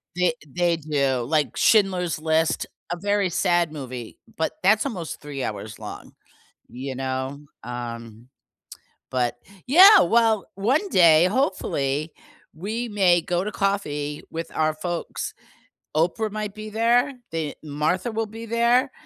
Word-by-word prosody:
They 180 -2 +2
they 175 +3 0
do, 140 -5 0
like 150 -1 0
Schindler's 185 -6 +3
List, 160 +1 +1 0.3
a 175 - -2
very 205 +1 +1
sad 175 -2 +1
movie, 125 -5 -7 0.2
but 160 - -1
that's 215 +5 +4
almost 185 - -5
3 145 -3 -5
hours 105 -1 -5
long, - - -9 0.6
you 130 +1 -6
know, 130 +1 -3 0.2
um, 115 -1 -7 0.8
but 125 -2 0 0.3
Yeah, 380 +9 +9
well, 225 -4 +3
one 260 - +1
day, 170 - +6
hopefully, 155 - -1 0.4
we 220 +9 -4
may 185 -4 +3
go 175 +2 -1
to 210 - -3
coffee 150 -9 -2
with 165 +1 -5
our 155 0 +1
folks. 170 +2 -4 0.6
Oprah 190 +7 +1
might 210 -1 -4
be 215 0 -7
there, 235 +5 +2 0.2
the 160 -3 -3
Martha 155 +9 -1
will 225 0 -1
be 225 +2 -9
there, 235 +4 +2
175 Hz, 130 wpm, -24 LUFS, 145-215 Hz, 0.8 s, Yeah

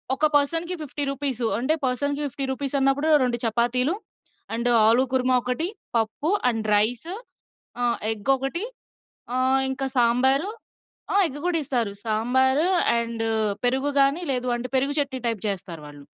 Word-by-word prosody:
ఒక 300 - +1
పర్సన్‌కి 330 +5 +2
50 290 0 -3
రూపీస్ 270 -3 -2
అంటే, 260 +6 0
పర్సన్‌కి 285 +3 -1
50 275 0 -4
రూపీసన్నప్పుడు 275 +2 0
2 240 -1 0
చపాతీలు, 240 +6 +1 0.6
అండ్ 235 +2 0 0.2
ఆలు 235 +4 +4
కుర్మా 255 0 +2
ఒకటి, 250 +8 -2 0.3
పప్పు 225 +8 -1 0.2
అండ్ 225 -2 -3
రైస్ 230 +10 +2 0.7
ఆహ్, 240 -1 +1
ఎగ్ 220 +4 0
ఒకటి 270 +8 -3 0.7
ఆహ్, 260 +1 +2
ఇంకా 270 0 -2
సాంబారు. 260 +8 +3 0.6
ఆ! - - -1
ఎగ్ 290 -1 -6
గూడా 355 -2 +1
ఇస్తారు. 240 -6 -1
సాంబారు 260 +7 +2 0.3
అండ్ 230 -1 -3 0.4
పెరుగు 265 +3 +1
గానీ, 275 +5 +3
లేదు 250 0 -1
అంటే 250 +1 -5
పెరుగు 275 +2 +1
చట్నీ 265 -3 -3
టైప్ 225 -4 -3
జేస్తారు 180 -5 -5
వాళ్ళు. 145 -1 -13
260 Hz, 140 wpm, -24 LUFS, 235-280 Hz, 0.7 s, ఆలు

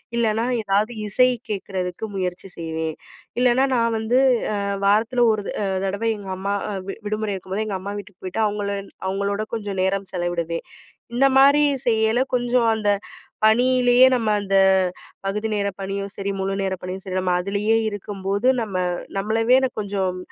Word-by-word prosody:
இல்லன்னா, 225 0 +1 0.2
ஏதாவது 205 +3 +1 0.2
இசை 250 +5 +4 0.2
கேக்குறதுக்கு 190 -1 -3
முயற்சி 185 0 -3
செய்வேன். 160 -1 -3 0.4
இல்லனா, 250 +1 +4
நான் 230 -1 +1
வந்து 225 +3 +2 0.4
அ - - -1 0.3
வாரத்துல 225 +4 +3
ஒரு 215 -1 -1
த - - -2
அ - - 0 0.2
தடவ 200 +4 -1
எங்க 200 -2 -9
அம்மா 200 +1 -2 0.2
அ - - -3 0.2
வி - - -4
விடுமுறை 215 -1 -2
இருக்கும்போது, 190 +3 -3
எங்க 200 -2 -2
அம்மா 200 +2 -5
வீட்டுக்கு 200 -1 -13
போய்ட்டு, 185 +4 -1
அவங்கள 205 -1 -3 0.4
அவங்களோட 200 +2 -1
கொஞ்சம் 205 -3 -4
நேரம் 195 0 -1
செலவிடுவேன். 175 -2 -2 0.5
இந்த 270 +3 +5
மாரி 280 +2 +6 0.2
செய்யயில, 220 +2 +3
கொஞ்சம் 245 -1 +2
அந்த, 210 -2 0 0.6
பணியிலேயே 245 +2 +5
நம்ம 230 -3 +1
அந்த 195 -1 -1 0.7
பகுதி 210 +3 -1
நேர 200 -1 0
பணியும் 195 0 -4
சரி, 200 0 -3
முழு 195 0 -1
நேர 190 -1 -1
பணியும் 185 +1 -6
சரி, 185 -1 -3
நம்ம 185 -1 0
அதுலயே 200 +4 +1
இருக்கும்போது 205 +2 -2
நம்ம 210 -4 -5 0.4
நம்மளவே 225 +6 +3
கொஞ்சம் 195 -3 -2
205 Hz, 155 wpm, -22 LUFS, 190-225 Hz, 0.7 s, மாரி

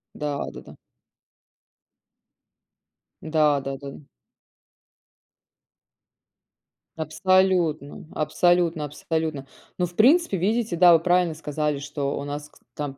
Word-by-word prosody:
Да-да-да. 145 -1 -5 2.5
Да-да-да-да. 140 -3 -1 3.0
Абсолютно 165 -2 +1
абсолютно 170 0 +1
абсолютно. 155 -1 -3 0.3
Но 180 - +1
в 175 0 -11
принципе, 275 - +4
видите, 210 +1 -1
да, 175 0 +7
вы 165 - +5
правильно 175 0 +2
сказали. 150 -1 -3
Что 145 -1 -4
у - - -4
нас 145 +1 -6
кс - - -24
там, 145 -2 -5
155 Hz, 85 wpm, -24 LUFS, 145-180 Hz, 3.0 s, да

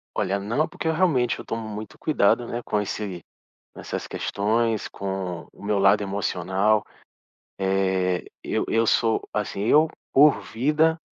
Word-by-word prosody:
Olha 100 +1 0
não, 115 +11 0
porque 160 - -5
eu 160 - +2
realmente, 150 -9 +2
eu - - -8
tomo 115 -1 -4
muito 105 0 -7
cuidado, 120 -5 +2
né, 120 +1 -4
com 105 - 0
esse 95 -4 -5 0.5
com - - -10
essas - - -5
questões, 110 +2 0
com 95 -3 -5
o - - -15
meu 105 0 0
lado 100 +2 +5
emocional. 100 +1 0 0.8
Eh, 95 -2 +1 0.2
eu - - -1
eu 115 0 +2
sou, 115 0 +2
assim, 105 -1 -2
eu, 155 +7 +5 0.2
por 145 +1 +6
vida, 155 +7 +1
105 Hz, 150 wpm, -24 LUFS, 95-120 Hz, 0.8 s, por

